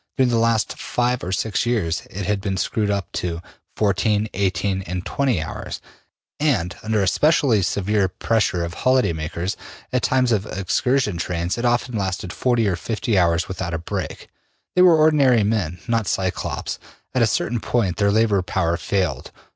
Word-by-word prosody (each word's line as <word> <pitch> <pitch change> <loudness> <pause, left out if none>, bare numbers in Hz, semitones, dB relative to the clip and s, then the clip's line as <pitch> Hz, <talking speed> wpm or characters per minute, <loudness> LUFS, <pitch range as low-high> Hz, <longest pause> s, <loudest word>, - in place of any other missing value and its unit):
During 130 -2 +3
the 115 -1 +2
last 115 -1 +1
five 125 0 -1
or 90 - -3
six 100 +2 0
years 95 -10 -1
it 95 +1 -5
had 105 0 0
been 95 -1 -2
screwed 105 +2 0
up 100 -3 -2
to 85 -2 -3 0.4
14, 105 +1 +1
18, 95 0 0
and 90 -1 -5
20 130 - 0
hours, 80 - -6 0.6
and 130 - +1
under 110 -2 0
a - - +1
specially 140 - +3
severe 100 +2 +1
pressure 95 -2 0
of 85 - -6
holiday 130 -3 +2
makers, 85 +4 -3 0.4
at 125 - +2
times 130 -2 +2
of 105 -2 +1
excursion 105 +3 0
trains, 85 +1 -2
it 120 - -3
often 120 0 +1
lasted 95 -3 -2
40 120 -4 +1
or 95 - +1
50 110 +4 -2
hours 85 -1 +2
without 95 -3 -4
a - - 0
break. 80 - -5 0.5
They 180 - +5
were 175 -3 +7
ordinary 140 -7 +4
men, 100 -5 -1
not 115 -3 0
Cyclops. 95 -1 -2 0.3
At 130 - +1
a 115 - +5
certain 115 +2 0
point 105 -6 0
their 100 -1 +3
labor 105 -2 +3
power 85 -2 0
failed. 90 -11 -1
100 Hz, 170 wpm, -22 LUFS, 90-120 Hz, 0.6 s, were